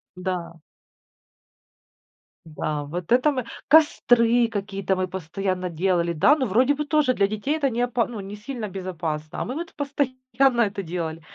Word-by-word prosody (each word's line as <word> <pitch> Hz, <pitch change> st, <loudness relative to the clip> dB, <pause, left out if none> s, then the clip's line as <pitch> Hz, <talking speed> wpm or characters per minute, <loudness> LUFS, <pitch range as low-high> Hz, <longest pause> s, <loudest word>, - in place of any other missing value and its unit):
Да. 180 Hz, -3 st, -4 dB, 1.8 s
Да. 150 Hz, -1 st, -3 dB
Вот 170 Hz, +5 st, -6 dB
это 255 Hz, +5 st, +5 dB
мы 255 Hz, -4 st, -3 dB, 0.2 s
костры 245 Hz, -6 st, +5 dB
какие-то 195 Hz, -3 st, -2 dB
мы 185 Hz, 0 st, -1 dB
постоянно 185 Hz, +1 st, -3 dB
делали. 170 Hz, 0 st, 0 dB
Да, 270 Hz, -, +5 dB
но, 265 Hz, -4 st, -1 dB
вроде 250 Hz, +7 st, +3 dB
бы, 300 Hz, +1 st, -3 dB
тоже 295 Hz, -4 st, +2 dB
для 200 Hz, -3 st, +2 dB
детей 215 Hz, +9 st, -2 dB
это 280 Hz, -3 st, +1 dB
не 240 Hz, 0 st, -2 dB
опа 245 Hz, -1 st, +1 dB
ну, 230 Hz, -4 st, -7 dB
не 200 Hz, +1 st, -7 dB
сильно 215 Hz, -1 st, -6 dB
безопасно, 170 Hz, -5 st, -4 dB
а -, -, -1 dB
мы 255 Hz, +5 st, -4 dB
вот 335 Hz, +1 st, -6 dB
постоянно 260 Hz, -3 st, 0 dB
это 200 Hz, -3 st, 0 dB
делали. 165 Hz, -2 st, -4 dB
205 Hz, 160 wpm, -24 LUFS, 180-255 Hz, 1.8 s, это